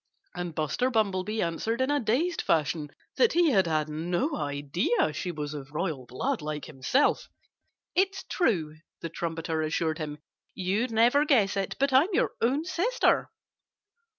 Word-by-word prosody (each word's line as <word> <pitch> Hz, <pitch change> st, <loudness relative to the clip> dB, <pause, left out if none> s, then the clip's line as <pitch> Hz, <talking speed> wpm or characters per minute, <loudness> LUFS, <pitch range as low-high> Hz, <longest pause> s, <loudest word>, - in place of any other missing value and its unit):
And 175 Hz, -2 st, -5 dB
Buster 155 Hz, -, 0 dB
Bumblebee 215 Hz, -2 st, 0 dB
answered 195 Hz, +8 st, -2 dB
in 260 Hz, +2 st, +1 dB
a 290 Hz, -, +2 dB
dazed 285 Hz, +10 st, 0 dB
fashion 150 Hz, -1 st, 0 dB, 0.3 s
that 475 Hz, -, +4 dB
he 340 Hz, -2 st, +4 dB
had 190 Hz, -7 st, +3 dB
had 155 Hz, -2 st, 0 dB
no 175 Hz, -, -1 dB
idea 145 Hz, +4 st, 0 dB
she 180 Hz, +3 st, -3 dB
was 150 Hz, -2 st, -5 dB
of 145 Hz, -2 st, -7 dB
royal 150 Hz, -7 st, -2 dB
blood, 250 Hz, -, -2 dB
like 150 Hz, 0 st, -4 dB
himself. 155 Hz, -, +1 dB, 0.6 s
"It's 385 Hz, +1 st, +1 dB
true," 160 Hz, -, 0 dB, 0.2 s
the 165 Hz, -, -4 dB
trumpeter 165 Hz, -1 st, -3 dB
assured 155 Hz, 0 st, -1 dB
him. 150 Hz, -1 st, -4 dB, 0.4 s
"You'd 200 Hz, +6 st, 0 dB
never 235 Hz, +6 st, +4 dB
guess 225 Hz, -10 st, +3 dB
it; 195 Hz, -1 st, -2 dB
but 275 Hz, 0 st, +2 dB
I'm 280 Hz, +8 st, +5 dB
your -, -, +2 dB
own 275 Hz, +7 st, +1 dB
sister." 385 Hz, +8 st, +1 dB
185 Hz, 150 wpm, -28 LUFS, 155-260 Hz, 0.6 s, I'm